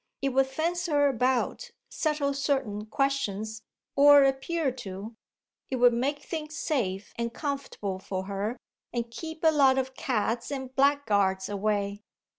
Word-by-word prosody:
It 275 - +2
would 270 0 +3
fence 335 +6 -1
her 290 -3 +3
about, 260 - 0 0.2
settle 300 -3 0
certain 265 -7 -1
questions, 220 -5 -1 0.3
or 285 0 +8
appear 270 +2 +1
to; 200 +1 -7 0.5
it 265 - -1
would 245 -1 +5
make 280 +5 -1
things 310 -1 -5
safe 205 -9 -2
and 235 0 -2
comfortable 275 -9 -4
for 190 0 -4
her 200 +5 -3 0.3
and 235 -1 -3
keep 320 +6 -7
a 320 - +6
lot 270 -3 +5
of 265 0 -1
cads 235 -2 -1
and 265 -2 -5
blackguards 205 -10 +2
away." 205 0 -1
265 Hz, 140 wpm, -28 LUFS, 215-285 Hz, 0.5 s, or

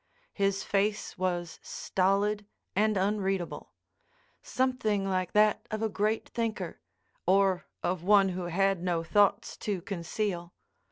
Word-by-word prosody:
His 195 -1 0
face 205 +1 0
was 175 -2 -2
stolid 200 +2 0 0.3
and 215 +1 +3
unreadable—something 210 - -2
like 185 -2 -1
that 210 0 +3
of 215 0 -3
a 220 - +1
great 215 +2 0
thinker, 220 -7 -3 0.5
or 190 -1 +3 0.2
of 180 -1 -1
one 200 0 +5
who 180 -1 -3
had 195 +1 +1
no 175 -2 0
thoughts 205 +4 +2
to 205 -3 -2
conceal. 175 0 -3
195 Hz, 115 wpm, -29 LUFS, 185-210 Hz, 0.5 s, one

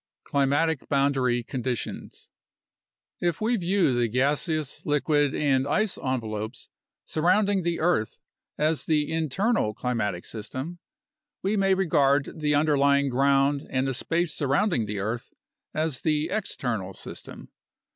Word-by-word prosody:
Climatic 145 +2 +1
Boundary 135 -3 +2
Conditions 125 0 -5 0.9
If 175 -2 0
we 230 +3 +1
view 185 - +2
the 120 -1 +2
gaseous, 145 - -1
liquid, 145 0 +1
and 135 -2 +2
ice 210 +7 +1
envelopes 110 -3 -4 0.4
surrounding 195 +5 +2
the 170 -1 -1
earth 160 - +1 0.4
as 155 +1 0
the 150 -2 +1
internal 160 - 0
climatic 105 -8 -2
system, 130 +10 -6 0.6
we 200 +3 +1
may 195 -1 +3
regard 145 -6 +2
the 150 -1 +1
underlying 140 -2 +3
ground 140 +2 +2
and 130 +1 0
the 135 - -1
space 165 +5 0
surrounding 140 - +1
the 105 0 -3
earth 110 +4 -3 0.4
as 155 -3 -2
the 155 0 0
external 115 - -3
system. - - -9
140 Hz, 120 wpm, -26 LUFS, 130-165 Hz, 0.9 s, may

